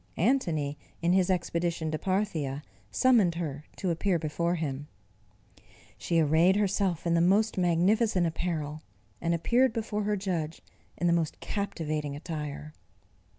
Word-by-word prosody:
Antony, 160 Hz, -, +1 dB, 0.2 s
in 175 Hz, +1 st, +3 dB
his 185 Hz, -1 st, +3 dB
expedition 170 Hz, -2 st, -1 dB
to 155 Hz, -, -2 dB
Parthia, 160 Hz, -8 st, -1 dB, 0.3 s
summoned 225 Hz, -10 st, +4 dB
her 150 Hz, -3 st, -4 dB
to 185 Hz, -, -1 dB
appear 175 Hz, +2 st, +1 dB
before 170 Hz, +2 st, -1 dB
him. 145 Hz, -3 st, -4 dB, 1.1 s
She 165 Hz, -, 0 dB
arrayed 160 Hz, +4 st, +4 dB
herself 195 Hz, -4 st, 0 dB
in 170 Hz, -, +2 dB
the 170 Hz, -, +4 dB
most 205 Hz, +5 st, +3 dB
magnificent 185 Hz, +3 st, +2 dB
apparel, 160 Hz, -2 st, -3 dB, 0.4 s
and 170 Hz, 0 st, +1 dB
appeared 240 Hz, +8 st, +2 dB
before 215 Hz, -2 st, -2 dB
her 210 Hz, 0 st, +1 dB
judge 170 Hz, -5 st, -3 dB, 0.3 s
in 175 Hz, -, -1 dB
the 170 Hz, -, +4 dB
most 165 Hz, -2 st, -1 dB
captivating 155 Hz, -8 st, -3 dB
attire. 150 Hz, -1 st, -6 dB
170 Hz, 135 wpm, -29 LUFS, 155-195 Hz, 1.1 s, summoned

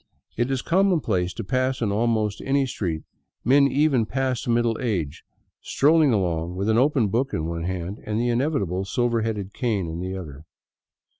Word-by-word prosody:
It 120 Hz, +3 st, 0 dB
is 135 Hz, -2 st, -1 dB
commonplace 160 Hz, -, +1 dB
to 115 Hz, -, -4 dB
pass 130 Hz, +5 st, 0 dB
in 110 Hz, -4 st, 0 dB
almost 110 Hz, -1 st, 0 dB
any 140 Hz, 0 st, +2 dB
street 85 Hz, -10 st, -3 dB, 0.4 s
men 140 Hz, +3 st, +5 dB
even 135 Hz, -4 st, +2 dB
past 130 Hz, -1 st, -2 dB
middle 120 Hz, -1 st, +2 dB
age 90 Hz, -, -2 dB, 0.4 s
scrolling 155 Hz, 0 st, +3 dB
along 90 Hz, -4 st, -1 dB
with 100 Hz, +3 st, -1 dB
an 110 Hz, -, +3 dB
open 130 Hz, -5 st, +2 dB
book 125 Hz, +7 st, 0 dB
in 80 Hz, -, -2 dB
one 85 Hz, 0 st, -3 dB
hand 95 Hz, +2 st, -4 dB
and 105 Hz, +1 st, -2 dB
the 120 Hz, +1 st, +1 dB
inevitable 115 Hz, -, 0 dB
silver 115 Hz, +3 st, 0 dB
headed 105 Hz, -3 st, -3 dB
cane 110 Hz, -9 st, -1 dB
in 80 Hz, +1 st, -5 dB
the 95 Hz, +1 st, -4 dB
other. 75 Hz, -5 st, -9 dB
115 Hz, 170 wpm, -24 LUFS, 95-130 Hz, 0.4 s, men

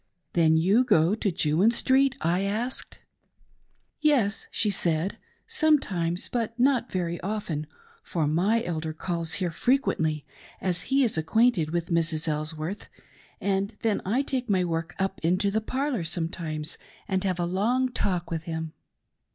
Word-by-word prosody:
" -, -, -50 dB
Then_j'o» 170 Hz, +7 st, +4 dB
go 190 Hz, -7 st, +4 dB
to 210 Hz, -2 st, 0 dB
Jewin 165 Hz, +6 st, +3 dB
Street 265 Hz, +2 st, +3 dB
.'" -, -, -32 dB
I 170 Hz, +3 st, +1 dB
asked. 220 Hz, +6 st, -2 dB, 0.5 s
" -, -, -41 dB
Yes," 220 Hz, -7 st, +1 dB
she 210 Hz, -, +1 dB
said, 170 Hz, 0 st, -1 dB, 0.2 s
" -, -, -39 dB
sometimes, 275 Hz, -, +1 dB
but 230 Hz, -1 st, -3 dB
not 255 Hz, -1 st, +2 dB
very 175 Hz, -2 st, -2 dB
often, 180 Hz, -7 st, -3 dB, 0.3 s
for 165 Hz, -3 st, -1 dB
my 190 Hz, +10 st, +2 dB
elder 160 Hz, -4 st, -3 dB
calls 165 Hz, 0 st, -3 dB
here 180 Hz, -3 st, 0 dB
fre 245 Hz, +10 st, +2 dB
quently, 160 Hz, -, 0 dB, 0.4 s
as 180 Hz, -2 st, 0 dB
he 275 Hz, 0 st, +4 dB
is 220 Hz, -9 st, +1 dB
acquainted 175 Hz, 0 st, +2 dB
with 170 Hz, +2 st, -2 dB
Mrs. 165 Hz, -1 st, +1 dB
Elsworth; 155 Hz, +5 st, -3 dB, 0.5 s
and 200 Hz, +2 st, -1 dB
then 220 Hz, -2 st, +1 dB
I 230 Hz, +9 st, +1 dB
take 260 Hz, -4 st, -3 dB
my 185 Hz, -3 st, +2 dB
work 165 Hz, 0 st, -3 dB
up 195 Hz, 0 st, -1 dB
into 185 Hz, +4 st, +2 dB
the 220 Hz, +2 st, 0 dB
parlor 260 Hz, -, -1 dB
sometimes 165 Hz, -2 st, -3 dB, 0.3 s
and 190 Hz, -1 st, 0 dB
have 185 Hz, -2 st, -1 dB
a 175 Hz, -, +1 dB
long 230 Hz, +9 st, +1 dB
talk 180 Hz, -7 st, -1 dB
with 165 Hz, -1 st, -3 dB
him. 160 Hz, -1 st, -4 dB
185 Hz, 160 wpm, -27 LUFS, 165-225 Hz, 0.5 s, Then_j'o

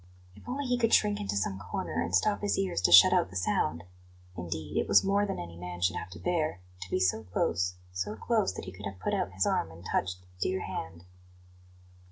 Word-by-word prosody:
If 105 Hz, -, -13 dB
only 275 Hz, +3 st, -2 dB
he 250 Hz, -1 st, 0 dB
could 230 Hz, -1 st, +5 dB
shrink 210 Hz, -1 st, +2 dB
into 100 Hz, 0 st, -2 dB
some 95 Hz, -1 st, -1 dB
corner 85 Hz, -2 st, -3 dB
and 85 Hz, +2 st, 0 dB
stop 205 Hz, -, +2 dB
his 205 Hz, -, 0 dB
ears 195 Hz, -, 0 dB
to 90 Hz, -, +3 dB
shut 90 Hz, +1 st, +9 dB
out -, -, +2 dB
the 95 Hz, -, -13 dB
sound! 85 Hz, -3 st, 0 dB, 0.5 s
Indeed, 80 Hz, -3 st, -5 dB
it -, -, +1 dB
was 100 Hz, -, +6 dB
more 200 Hz, +1 st, +2 dB
than 195 Hz, -, -3 dB
any 85 Hz, -1 st, -7 dB
man 90 Hz, 0 st, -7 dB
should 90 Hz, +1 st, +1 dB
have 90 Hz, -, -5 dB
to 90 Hz, -2 st, -10 dB
bear 155 Hz, -, -1 dB, 0.2 s
to 90 Hz, -, -7 dB
be -, -, 0 dB
so 95 Hz, +4 st, +2 dB
close, 90 Hz, 0 st, 0 dB, 0.2 s
so 95 Hz, +4 st, -3 dB
close 215 Hz, -, +1 dB
that -, -, -6 dB
he 90 Hz, -, -7 dB
could 100 Hz, +2 st, -7 dB
have 100 Hz, -1 st, -8 dB
put 90 Hz, -, -2 dB
out 95 Hz, -, -1 dB
his 95 Hz, 0 st, +1 dB
arm 80 Hz, -, +1 dB
and 85 Hz, +2 st, -13 dB
touched 95 Hz, -2 st, -1 dB
the -, -, -24 dB
dear 95 Hz, +1 st, 0 dB
hand. 85 Hz, +2 st, -6 dB
95 Hz, 235 wpm, -30 LUFS, -, 0.5 s, shut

